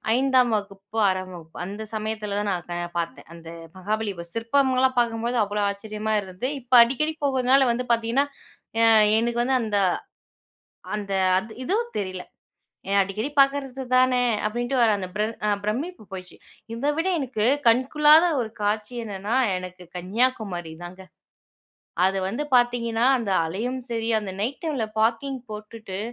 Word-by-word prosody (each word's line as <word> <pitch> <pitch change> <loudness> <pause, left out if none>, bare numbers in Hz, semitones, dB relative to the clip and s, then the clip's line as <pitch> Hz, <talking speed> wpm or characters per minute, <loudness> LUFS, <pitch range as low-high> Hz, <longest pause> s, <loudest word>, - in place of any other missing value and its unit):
5 255 -3 +3
வகுப்பு, 200 +1 -9
6 185 0 -1
வகுப்பு, 160 -2 -12
அந்த 205 +3 -6
சமயத்துல 215 -1 -3
தான் 205 -1 -1
நான் 175 -1 -4
பாத்தேன். 170 - -5
அந்த 165 -1 -11 0.3
மகாபலி 210 +2 -2 0.2
சிற்பங்கள்லாம் 260 +2 +2
பாக்கும்போது 235 +1 0
அவ்வளோ 205 +1 -2
ஆச்சரியமா 215 +1 -3
இருந்து, 190 +8 -4
இப்போ 245 +1 +4
அடிக்கடி 305 +6 -1
போறதுனால 265 -1 +3
வந்து 250 +2 -2
பாத்திங்கன்னா, 235 +5 +1 0.6
ஆ - - +7 0.3
எனக்கு 235 +1 0
வந்து 260 +1 +2
அந்த 210 -2 0 1.2
அந்த 200 -2 -4 0.2
அது 220 +3 -6
ஏதோ 370 - 0 0.2
தெரியல, 185 -2 -4 0.7
ஏ - - -3
அடிக்கடி 210 +8 -2
பார்க்கறது 275 -1 +2
தானே, 255 -1 +4 0.2
அப்படின்ட்டு 240 +4 -1
வர 230 - +5
அந்த 185 -2 -4 0.4
அ - - +2
பிரமிப்பு 255 - -3
போயிடுச்சு, 185 -1 -8 0.4
இதை 275 +6 -1
விட 330 +3 0
எனக்கு 250 -6 -2 0.2
கண்கொள்ளாத 300 +7 +5 0.2
ஒரு 220 - -4
காட்சி 210 +3 -1
என்னன்னா, 205 +1 -3 0.2
எனக்கு 180 0 -8
கன்னியாகுமாரி 190 -3 -1
தாங்க. 185 +2 -9 1.0
அது 190 +1 +2
வந்து 235 +9 -3
பாத்தீங்கன்னா, 240 -1 +1
அந்த 215 -4 -3
அலையும் 230 +10 -3
சரி, 225 0 -2
அந்த 200 -2 -5
நைட் 250 +6 -2
டைமில 290 -8 -1 0.2
பார்க்கிங் 265 +4 0
போட்டுட்டு, 215 -2 -7
225 Hz, 140 wpm, -24 LUFS, 200-255 Hz, 1.2 s, ஆ